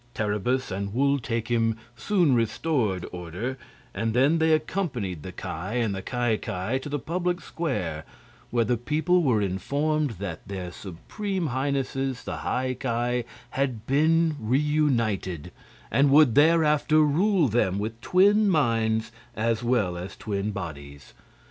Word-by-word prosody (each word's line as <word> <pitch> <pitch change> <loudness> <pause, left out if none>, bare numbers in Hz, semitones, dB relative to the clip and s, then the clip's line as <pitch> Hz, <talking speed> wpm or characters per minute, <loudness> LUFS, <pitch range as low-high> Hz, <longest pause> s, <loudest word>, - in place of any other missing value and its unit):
Terribus 105 +5 -1
and 100 +2 -4
Wul 140 +2 +2
Takim 115 -1 0 0.2
soon 175 - +2
restored 115 - 0
order, 90 +10 -5 0.3
and 115 0 -2
then 140 +6 +4
they 160 0 +3
accompanied 150 - -1
the 95 - -7
Ki - - -8
and 105 +6 -2
the 95 - -4
Ki 120 0 0
Ki 100 +9 -2
to 140 - -7
the 145 - -1
public 175 +5 -2
square, 105 - -3 0.5
where 120 -1 +1
the 120 +1 +1
people 155 +9 +1
were 120 -9 +2
informed 140 +8 -1
that 95 -3 -6
their 95 -3 -5
Supreme 165 - -4
Highnesses, 135 -1 -2
the - - -5
High 130 0 -1
Ki, 120 -1 -1 0.2
had 130 -5 -2
been 160 +3 +2
reunited 120 - 0 0.4
and 140 +1 +4
would 140 -3 +6
thereafter 155 0 +4
rule 170 +3 +3
them 100 -5 +1
with 110 +3 -4
twin 205 +3 +4
minds 115 -8 +1 0.2
as 115 +1 0
well 115 -8 +1
as 95 +2 -7
twin 100 -1 -3
bodies. 70 - -8
120 Hz, 135 wpm, -26 LUFS, 105-150 Hz, 0.5 s, would